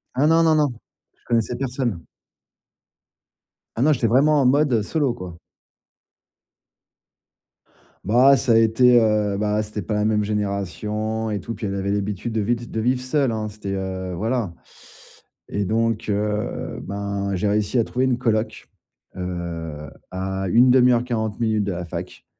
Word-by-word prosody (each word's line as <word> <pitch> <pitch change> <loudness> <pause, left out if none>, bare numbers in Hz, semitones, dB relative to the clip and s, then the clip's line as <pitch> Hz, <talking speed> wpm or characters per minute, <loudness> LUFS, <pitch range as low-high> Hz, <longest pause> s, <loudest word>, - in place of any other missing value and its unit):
Ah 135 - +2
non, 165 +1 +5
non, 160 -1 +4
non! 150 -2 +3 0.5
Je - - -36
connaissais 120 0 0
personne. 125 - -2 1.7
Ah 115 - -2
non. 150 +2 +5
J'étais 120 -3 +1
vraiment 140 +5 +4
en - - +2
mode, 140 +1 +3
heu, 110 - +2
solo, 140 0 0
quoi. 90 -6 -9 2.7
Bah, 130 +6 +5
ça 125 -4 +2
a - - +6
été, 120 +2 +5
heu, 105 -2 +1
bah, 105 0 0
c'était 105 0 -5
pas 105 +4 -3
la 105 0 +1
même 105 -1 +2
génération 105 +2 -2
et 105 - -2
tout. 115 - -6
Puis, 110 - -5
elle 100 - -3
avait 100 0 -2
l'habitude 105 +2 -2
de 110 - 0
vid 120 +2 -2
de 110 - -2
vivre 125 +3 +1
seule, 130 -1 +1
hein. 110 -1 -3
C'était, 100 -2 -6
heu, 95 -1 -4
voilà 110 -1 -1 1.0
et 100 - -1
donc, 115 +1 0
heu, 105 +1 -2
ben, 100 0 -3
j'ai 100 +3 0
réussi 105 +4 +1
à - - +4
trouver 125 - -1
une 125 -2 +1
coloc, 115 -2 -1 0.5
heu, 85 -4 -5 0.2
à 95 +1 -3
1/2 125 +3 +5
heure-40 115 -3 -1
minutes 110 -3 +1
de 100 - -2
la 90 0 -5
fac - - -7
110 Hz, 160 wpm, -22 LUFS, 100-120 Hz, 2.7 s, a